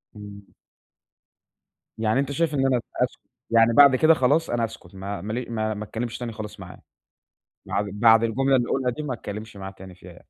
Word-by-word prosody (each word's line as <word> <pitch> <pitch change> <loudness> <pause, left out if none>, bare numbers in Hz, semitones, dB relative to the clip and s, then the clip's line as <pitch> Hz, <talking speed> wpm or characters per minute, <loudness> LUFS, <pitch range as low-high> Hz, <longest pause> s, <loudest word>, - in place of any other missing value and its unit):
إمم. 100 -1 -11 1.5
يعني 110 +3 +1
أنت 140 0 -1
شايف 155 +1 0
إن 135 -1 +1
أنا 125 -3 +2 0.2
أسكت، - - -3 0.3
يعني 115 0 +5
بعد 140 0 +7
كده 160 +5 +5
خلاص، 150 +4 +2
أنا 120 -1 0
أسكت 100 -5 -12
ما 100 +1 -5
ما 110 +2 -5
لي 125 +1 -3
ما 110 -2 -2
اتكلمش 115 +2 -5
تاني 120 -2 -5
خلاص 110 -1 -8
معاه، - - -11 0.9
بعد 100 +1 -1
بعد 115 +2 +5
الجملة 135 +4 +2
اللي 120 -1 0
أقولها 130 -2 0
دي، 150 +6 -6
ما 135 -4 -3
اتكلمش 105 -1 -8
معاه 95 0 -7
تاني 95 -1 -13
فيها 90 0 -15
يعني. - - -17
115 Hz, 190 wpm, -24 LUFS, 105-130 Hz, 1.5 s, بعد